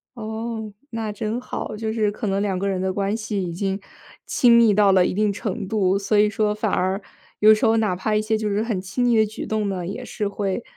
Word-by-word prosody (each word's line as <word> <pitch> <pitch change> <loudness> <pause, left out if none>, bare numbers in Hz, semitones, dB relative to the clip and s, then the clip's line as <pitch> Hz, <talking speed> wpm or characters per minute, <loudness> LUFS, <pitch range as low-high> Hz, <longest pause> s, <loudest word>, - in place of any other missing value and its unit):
哦， 220 -1 -5 0.2
那 225 -2 -3
真 220 +2 -3
好。 250 -3 -5
就 220 +1 -3
是 215 -2 +1
可 215 +1 -4
能 195 0 0
两 200 -2 -1
个 195 +2 -1
人 190 -2 -1
的 190 0 0
关 200 +2 -1
系， 215 -3 -3
已 175 -2 -4
经 195 +2 -2 0.5
亲 240 -2 +4
密 230 -3 +6
到 205 -1 +5
了 185 -2 +5
一 - - -1
定 210 +2 +1
程 200 -1 -4
度， 195 -2 +2
所 205 +1 +1
以 210 0 +5
说 210 0 0
反 215 -1 -1
而 190 +2 0 0.4
有 215 +1 +8
时 215 - +1
候 225 0 +4
哪 215 -5 +1
怕 215 +4 -1
一 210 - +2
些 220 0 0
就 215 -1 -2
是 205 +2 0
很 225 -5 -2
亲 190 +7 -2
昵 240 -2 +3
的 220 - +5
举 215 +1 -6
动 215 -2 -1
呢， 185 -3 -3
也 205 +7 -5
是 215 -4 -3
会 200 -1 -2
210 Hz, 265 characters per minute, -23 LUFS, 195-220 Hz, 0.5 s, 有